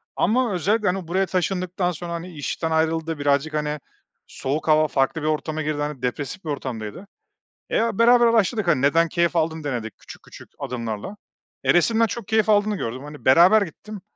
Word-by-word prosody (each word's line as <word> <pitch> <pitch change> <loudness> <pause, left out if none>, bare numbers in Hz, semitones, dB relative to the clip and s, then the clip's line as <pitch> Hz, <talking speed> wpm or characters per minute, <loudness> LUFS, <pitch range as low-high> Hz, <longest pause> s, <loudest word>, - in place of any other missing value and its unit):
Ama 230 +1 +1
özellikle, 205 +5 +1
hani, 180 -2 -1
buraya 190 +3 +1
taşındıktan 185 0 -1
sonra, 170 +1 -6
hani, 170 +1 -6
işten 160 +2 -3
ayrıldı 160 -1 0
birazcık, 145 +2 +1
hani, 150 0 -2 0.5
soğuk 145 +4 -4
hava 155 0 +4
farklı 135 +3 0
bir 155 - -2
ortama 155 0 -2
girdi, 150 0 -2
hani, 150 -3 -4
depresif 145 +9 -4
bir - - -4
ortamdaydı. 130 - -5 0.6
Eee, 230 0 +1
beraber 240 +1 +6
araştırdık, 220 -3 +2
hani, 135 -5 +2
neden 165 +4 +3
keyif 170 0 0
aldığını 160 -1 -1
denedik 120 -6 -4
küçük - - -13
küçük - - -14
adımlarla. 120 - -5 0.5
Eee, - - +4
resimden 225 +6 +3
çok 220 -2 -6
keyif 220 -1 +2
aldığını 210 0 +3
gördüm, 125 0 -5
hani, 150 0 -11
beraber 175 +11 +6
gittim 200 +3 -8
165 Hz, 175 wpm, -23 LUFS, 145-195 Hz, 0.6 s, beraber